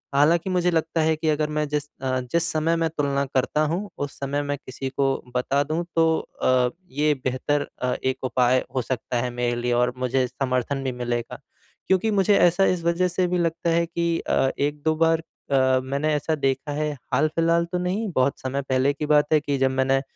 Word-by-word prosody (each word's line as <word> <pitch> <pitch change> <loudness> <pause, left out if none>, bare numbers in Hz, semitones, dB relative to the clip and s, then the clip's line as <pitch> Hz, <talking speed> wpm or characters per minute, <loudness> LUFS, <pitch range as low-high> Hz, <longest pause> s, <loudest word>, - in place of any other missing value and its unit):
हालाँकि 165 +6 +3
मुझे 180 -1 +1
लगता 165 0 0
है 160 0 +2
कि 155 0 -1
अगर 150 0 +1
मैं 150 0 -1
जिस 150 0 -1 0.2
अ, 130 -1 0
जिस 170 0 +3
समय 160 +2 +1
मैं 165 -1 0
तुलना 140 -2 -1
करता 135 +3 0
हूँ 195 +5 -3 0.2
उस 140 - -12
समय 140 +1 -1
मैं 145 0 -2
किसी 130 0 -6
को 135 +1 0 0.3
बता 135 +3 +1
दूँ 155 +4 -2
तो 165 -1 +4
अ, 125 -1 +1 0.2
ये 150 +2 +2
बेहतर 135 +3 -1
अ, 125 0 0
एक 130 0 -1
उपाय 130 0 +2
हो 130 - +2
सकता 125 0 -3
है 125 - -2
मेरे 120 0 -1
लिए 120 0 0
और 125 +1 +2
मुझे 130 +1 +1
समर्थन 130 +1 -2
भी 130 - -1
मिलेगा। 120 -1 -4 0.5
क्योंकि 190 +4 +2
मुझे 200 0 +3
ऐसा 175 +2 +4
इस 180 -3 0
वज़ह 170 +2 +2
से 180 +1 0
भी 180 0 0
लगता 170 0 0
है 170 0 +2
कि 170 0 -1
अ, 135 - +1
1-2 150 +2 0
बार 165 0 +2 0.3
अ, 130 -1 +3
मैंने 140 +4 -1
ऐसा 155 +2 -1
देखा 135 0 -1
है 150 +1 -1 0.2
हाल-फ़िलहाल 165 +3 +2
तो 180 - 0
नहीं 190 +5 -1
बहुत 130 +2 +1
समय 135 +2 -2
पहले 130 +2 +2
की 150 +1 -4
बात 150 0 +3
है 155 - +6
कि 145 -1 -2
जब 135 0 +2
मैंने, 135 +1 +2
145 Hz, 205 wpm, -24 LUFS, 130-165 Hz, 0.5 s, है